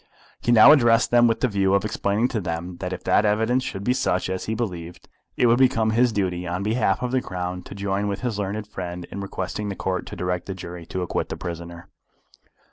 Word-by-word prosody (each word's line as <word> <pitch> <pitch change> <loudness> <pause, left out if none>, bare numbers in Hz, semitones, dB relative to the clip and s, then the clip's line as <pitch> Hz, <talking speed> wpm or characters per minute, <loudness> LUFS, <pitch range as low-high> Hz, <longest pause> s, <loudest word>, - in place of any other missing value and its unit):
He 120 - +1
now 120 +4 +9
addressed 120 -5 +4
them 120 0 +6
with 115 - 0
the 130 - +3
view 100 -3 +2
of 100 - +1
explaining 105 +2 0
to 110 -5 -2
them 85 +1 -4
that 90 0 -4
if - - -5
that - - +3
evidence 110 +4 +2
should 95 -5 -5
be 125 - +2
such 95 -8 0
as 95 - -3
he 110 - -2
believed, 90 -6 -5 0.3
it - - +3
would 120 +1 +4
become 115 -4 +3
his 120 +2 +3
duty 90 -4 -2
on 90 +3 -2
behalf 115 +3 +1
of 125 - -1
the 130 0 +1
Crown 90 -2 -4
to 95 - -11
join 100 +1 -1
with 100 -1 -3
his 120 -5 -2
learned 105 +2 -3
friend 90 -4 -6
in 100 - -5
requesting 100 +1 -4
the 100 - -4
Court 95 0 -3
to - - -7
direct 90 0 -3
the 95 - -4
jury 85 -2 -8
to 95 - -3
acquit 90 - -2
the - - -5
prisoner. 85 0 -7
100 Hz, 230 wpm, -24 LUFS, 90-115 Hz, 0.3 s, now